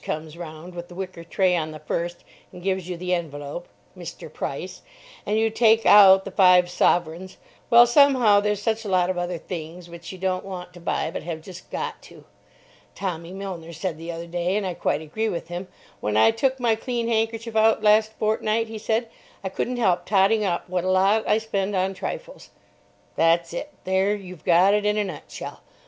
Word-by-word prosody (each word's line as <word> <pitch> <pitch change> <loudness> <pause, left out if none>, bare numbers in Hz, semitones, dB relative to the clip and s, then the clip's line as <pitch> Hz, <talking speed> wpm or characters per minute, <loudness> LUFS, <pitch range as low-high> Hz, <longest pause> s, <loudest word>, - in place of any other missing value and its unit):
comes 155 0 -5
round 170 +1 -9
with 175 0 -7
the 175 - -13
wicker 185 -2 -6
tray 180 +2 +1
on 160 -2 -1
the 155 0 -9
1st, 170 +3 -3 0.4
and 180 - -12
gives 190 -2 -1
you 180 - -4
the 180 +1 -2
envelope 150 -1 -4 0.3
("Mr. - - -9
Price") - - -5 0.5
and 210 - +1
you 225 0 +2
take 225 0 +4
out 195 -2 +8
the 195 - -6
five 180 -2 +5
sovereigns—well, 180 +8 +2
somehow, 245 -5 +5
there's 210 0 -1
such 225 0 0
a 210 - -5
lot 185 -1 +2
of 180 - -3
other 175 0 -3
things 170 +1 -8
which 170 0 -9
you 190 - -9
don't 185 0 -1
want 180 -2 -8
to 175 - -12
buy 165 -1 -2
but - - -5
have 160 -1 -6
just 185 0 -11
got - - -4
to. - - -15 0.7
Tommy 170 -3 -4
Milner 185 -4 -7
said 165 -1 -4
the 165 +1 -6
other 170 0 -6
day, 175 +2 -2
and 210 - -2
I 185 - -2
quite 150 -3 -1
agree 220 +9 -2
with 170 -3 -5
him, 175 +2 -5 0.3
"When 105 0 -1
I 110 - +6
took 260 +4 0
my 235 -2 +2
clean 235 +1 -3
handkerchief 225 0 -1
out 220 0 +3
last 215 +1 +4
fortnight," 220 +1 0
he 220 -1 -6
said, 225 +2 -1 0.4
"I 190 - -2
couldn't 245 +6 -3
help 180 -6 +1
totting 205 +2 +3
up 175 -4 -1
what 180 -1 -2
a 185 - -1
lot 195 +4 +3
I 210 - +4
spend 205 -3 -2
on 190 +1 0
trifles." - - -7 0.7
That's 165 +1 +2
it. 295 +12 -5
There 190 +2 +1
you've 185 -5 -11
got 180 +3 +5
it 210 0 +2
in 210 0 +1
a 210 - +2
nutshell. 185 -6 -8
185 Hz, 200 wpm, -24 LUFS, 175-215 Hz, 0.7 s, out